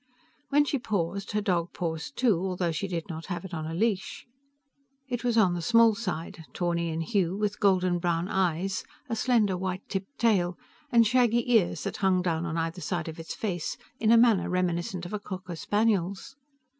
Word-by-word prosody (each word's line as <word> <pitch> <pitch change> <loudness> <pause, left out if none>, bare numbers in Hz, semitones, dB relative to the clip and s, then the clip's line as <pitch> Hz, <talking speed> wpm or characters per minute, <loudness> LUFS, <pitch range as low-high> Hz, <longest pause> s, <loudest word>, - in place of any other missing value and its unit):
When 290 +1 +4
she 280 -1 -1
paused, 200 -3 -2
her 210 - +1
dog 175 -4 0
paused 160 -2 -4
too, 230 -9 +3
although 180 -2 -1
she 180 +5 -2
did 170 -3 -4
not 165 -2 -7
have 175 -1 -4
it 190 - -9
on 155 -1 -3
a 160 - -4
leash. 205 0 -1 0.8
It 245 -2 -3
was 240 -2 +1
on 190 -5 +5
the 175 - -3
small 230 +3 +5
side, 170 -6 -5
tawny 170 -1 -1
in 160 0 -2
hue, 190 0 0
with 205 -1 -1
golden 185 -3 +3
brown 170 0 0
eyes, 190 0 0 0.3
a 230 - 0
slender 220 -5 +2
white 185 +1 -4
tipped 195 +8 -5
tail, 185 -7 +2 0.3
and 235 -2 +6
shaggy 240 0 +2
ears 175 -8 +3
that - - -3
hung 185 -2 +2
down 170 -1 -1
on 165 0 -3
either 165 +2 -2
side 170 +1 -2
of 160 - -9
its 165 - -6
face 180 -7 -3 0.2
in 220 0 +3
a 235 - +7
manner 230 -4 +4
reminiscent 175 0 -1
of 175 - -7
a 210 - -1
cocker 185 -3 -7
spaniel's. 205 +4 0
185 Hz, 195 wpm, -28 LUFS, 170-215 Hz, 0.8 s, a